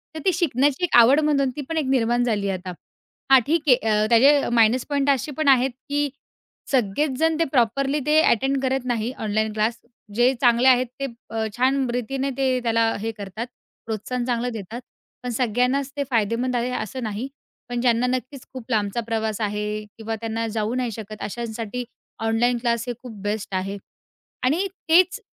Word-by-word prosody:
तर - - -4
ती 375 - +3
शिकण्याची 290 -2 +1
1 355 - +2
आवड 245 +5 +7
म्हणून 290 -3 +2
ती 295 - -4
पण 325 - -2
एक 310 - +1
निर्माण 240 -2 +2
झाली 210 -4 0
आहे 190 - -1
आता. 180 0 -7 0.6
हां, 265 - +9
ठीक 325 +2 +2
आहे 250 - +8
अ, 210 0 +3
त्याचे 275 +5 +5
मायनस 230 +2 +4
पॉईंट 285 -1 +1
असे 275 +1 +1
पण 310 -2 0
आहेत, 265 -1 +5 0.2
की 290 0 0 0.6
सगळेचजण 275 +6 +1
ते - - +4
प्रॉपरली 270 +3 +1
ते 305 +1 +4
अटेंड 270 0 +2
करत 265 -1 0
नाही. 240 -1 -1
ऑनलाईन 215 0 0
क्लास 220 +2 0 0.4
जे 245 +3 +4
चांगले 245 0 +4
आहेत, 255 0 +5
ते 275 - -1 0.2
अ, 225 0 -2
छानरीतीने 260 0 0
ते 260 -2 +1
त्याला 230 -1 +2
हे 225 +2 -3
करतात 205 +4 -6 0.4
प्रोत्साहन 230 +3 -3
चांगलं 245 0 -1
देतात. 225 +3 -7 0.4
पण 250 - -3
सगळ्यांनाच 250 +4 0
ते 285 - +1
फायदेमंद 235 +2 0
आहे 240 +1 0
असं 250 +1 -4
नाही, 220 +3 -3 0.4
पण 245 -1 -2
ज्यांना 240 0 +2
नक्कीच 255 +1 -4
खूप 255 -3 -8
लांबचा 210 0 0
प्रवास 220 -2 -2
आहे 210 0 -2
किंवा 225 0 -4
त्यांना 225 0 -2
जाऊ 220 0 -2
नाही 250 -2 -1
शकत, 215 0 -8
अशांसाठी 230 +1 -4 0.4
ऑनलाईन 230 +2 +2
क्लास 235 -1 0
हे 245 - -2
खूप 245 -3 -8
बेस्ट 205 -1 -3
आहे 195 +2 -2 0.7
आणि 320 +10 +2 0.2
तेच 365 +2 +5
245 Hz, 175 wpm, -23 LUFS, 220-270 Hz, 0.7 s, हां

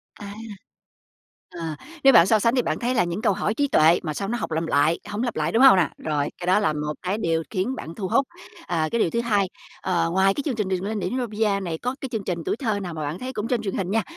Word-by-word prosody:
À. 200 -1 -9 1.2
Ờ, 165 -3 -5 0.3
nếu 270 0 +7
bạn 170 - +8
so 220 0 +4
sánh 230 +4 +2
thì 250 - +3
bạn - - -2
thấy 250 +1 -1
là 180 - +4
những 175 +4 -3
câu 200 - +3
hỏi 205 +2 -1
trí 285 +4 +1
tuệ 165 - +5
mà 155 -3 -3
sao 195 +5 -3
nó 240 +3 -1
học - - -4
làm 160 +1 -1
lại 155 +4 +2
hổng 210 +4 -2
lặp 240 - -2
lại, 155 +1 -1
đúng 230 +7 +4
hông 265 -5 +9
nà? 175 -6 +2
Rồi, 150 -2 -1
cái 175 - -7
đó 185 +3 +4
là 180 -7 +1
một 150 0 -3
cái 190 +3 -1
điều 165 -5 0
khiến 220 +6 -1
bạn 165 -8 -8
thu 195 -4 -3
hút. 270 +7 +2 0.4
Ờ, 160 -3 0
cái 235 - 0
điều 170 - +2
thứ 235 - -1
2, 205 -5 +1 0.3
ờ, 170 -3 0
ngoài 190 +2 +3
cái 285 - -4
chương 265 -6 -1
trình 210 -4 -1
"Đường 185 -1 -1
lên 210 +1 -2
đỉnh 180 +3 -3
Olympia" 215 -5 0
này 170 -4 -4
có 250 +8 -3
cái 265 - -4
chương 220 -4 -3
trình 175 -2 -2
tuổi - - 0
thơ 220 -6 -1
nào 180 -4 -5
mà 155 - -5
bạn 150 +4 -4
thấy 260 +1 -5
cũng 210 +2 -3
trên 245 -4 0
truyền 195 -3 -3
hình 190 -1 -2
nha, 225 +1 +2
195 Hz, 290 wpm, -24 LUFS, 170-230 Hz, 1.2 s, hông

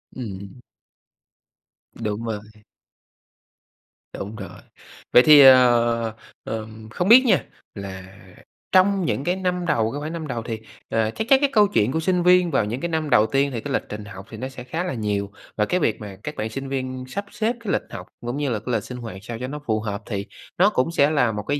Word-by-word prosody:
Ừm. 100 -3 -7 1.3
Đúng 110 -1 -4
rồi. 110 -2 -3 1.8
Đúng 105 +3 -6
rồi. 100 -3 -9 0.5
Vậy 125 - +8
thì, 150 0 +9
ờ, 120 -3 +5 0.3
ờm, 110 0 -7
không 180 - -2
biết 250 +3 +9
nha, 235 - +3 0.3
là 95 -2 -7 0.7
trong 190 0 +4
những 140 - -1
cái 175 +4 0
năm 180 -1 -2
đầu 115 -9 +1
cái 145 - -4
khoảng 155 +2 -5
năm 160 -2 -5
đầu 120 -4 -3
thì, 115 -1 -5 0.3
ờ, 110 -1 +1
chắc 220 - -3
chắc 270 - +7
cái 285 - +3
câu 210 -2 +5
chuyện 125 - +1
của 160 - 0
sinh 180 +1 +1
viên 180 -1 +5
vào 110 - +2
những 120 +5 -4
cái 170 - -2
năm 160 -2 -1
đầu 105 -6 +5
tiên 140 +4 +1
thì 115 - -3
cái 145 - -4
lịch - - 0
trình 105 0 -6
học 95 -1 -10
thì 110 - -9
nó 130 +4 -5
sẽ 130 -2 -9
khá 160 +8 -3
là 180 - -3
nhiều. 105 -3 -2 0.3
Và 105 - +2
cái 180 - 0
việc 115 - 0
mà 100 -2 -8
các 150 - -5
bạn 110 +1 -3
sinh 135 +4 -6
viên 130 -1 -4
sắp 200 +10 -5
xếp 230 +2 -1
cái 220 -4 -3
lịch - - +1
học - - -8
cũng 120 +3 -4
như 145 -2 -1
là 110 - -1
cái 120 +4 -4
lịch - - 0
sinh 125 - -8
hoạt 115 -5 -7
sao 115 +2 -6
cho 125 - -4
nó 150 +3 -6
phù 110 -3 0
hợp, 105 -1 -4
thì 100 -3 -4 0.3
nó 190 +4 +5
cũng 165 -6 0
sẽ 145 -3 +3
là 140 -7 +2
một 105 -1 -4
cái 145 +6 -1
125 Hz, 225 wpm, -23 LUFS, 110-160 Hz, 1.8 s, thì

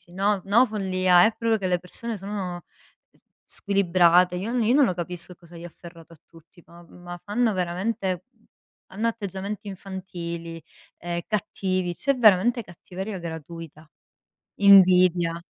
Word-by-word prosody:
si, 175 - -20
no, 200 +1 0
no 230 +6 +5
follia, 185 -4 +3
è 220 - +2
proprio 225 -1 0
che 190 - -3
le 180 -1 +1
persone 225 +5 -4
sono 190 -3 -5 0.8
squilibrate. 180 -2 +2
Io 205 +6 -4
n 245 -2 +1
io 240 +4 +3
non 290 -1 +5
lo 185 - -1
capisco 175 +1 -5
cosa 170 0 -16
gli 170 - -10
ha - - -5
afferrato 170 -1 -15
a 155 - -24
tutti, 165 +1 -20
ma 170 0 -16
ma 175 0 -10
fanno 220 +2 0
veramente 185 +1 -2 0.7
hanno 220 +4 -1
atteggiamenti 205 -2 -5
infantili, 170 -4 -7 0.4
ehm, 175 0 -4
cattivi, 185 -3 -2
c'è 275 - 0
veramente 230 +1 +4
cattiveria 190 +2 -8
gratuita. 165 -1 -9 0.7
Invidia. 180 -3 +5
185 Hz, 145 wpm, -24 LUFS, 175-205 Hz, 0.8 s, no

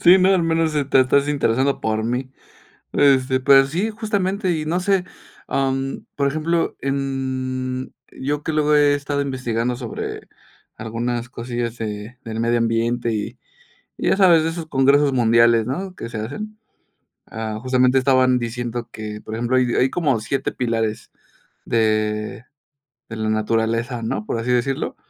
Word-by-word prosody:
Sí, 180 +2 +8
no, 185 - +4
al 180 - +2
menos, 165 -1 +1
sí 150 -2 0
te 135 -1 +4
estás 140 +2 +3
interesando 135 -1 +1
por 110 0 -1
mí. 125 +2 -2 0.6
Este, 130 -2 +3
pero 135 +1 +6
sí, 180 +10 -1
justamente 205 -3 -1
y 155 -2 -2
no 175 +3 0
sé, 190 -1 +1 0.4
am, 135 0 -1
por 140 -1 +2
ejemplo, 165 +3 -1
em, 130 -2 -3 0.2
yo 145 +2 -3
que 160 - -2
luego 150 -1 +2
he 145 -1 +5
estado 145 0 -2
investigando 125 -3 -2
sobre 120 -3 -6 0.5
algunas 120 +2 -3
cosillas 120 -1 -4
de 105 +2 -5
del 115 0 -4
medio 120 +1 +2
ambiente 115 +1 0
y 110 +3 -4 0.6
y - - 0
ya - - +3
sabes, 175 -5 +5
de 165 - 0
esos 165 -1 -6
congresos 140 0 +3
mundiales, 115 -2 +4
¿no?, 185 +7 -4
que - - -6
se 115 -2 -6
hacen. 215 - -6 0.7
Ah, 110 -1 -5
justamente 130 0 +3
estaban 130 -1 +4
diciendo 120 0 -4
que, 105 -1 -7
por 110 - -8
ejemplo, 120 +3 0
hay 130 - +4
hay 130 - +3
como 145 -9 0
7 125 +6 -2
pilares 115 -2 -2 0.5
de 110 0 0 0.6
de 110 - -7
la 110 0 -2
naturaleza, 115 +2 0
¿no?, 110 -1 -2
por 115 - -3
así 115 +2 -2
decirlo, 125 +2 -1
130 Hz, 160 wpm, -21 LUFS, 115-145 Hz, 0.7 s, Sí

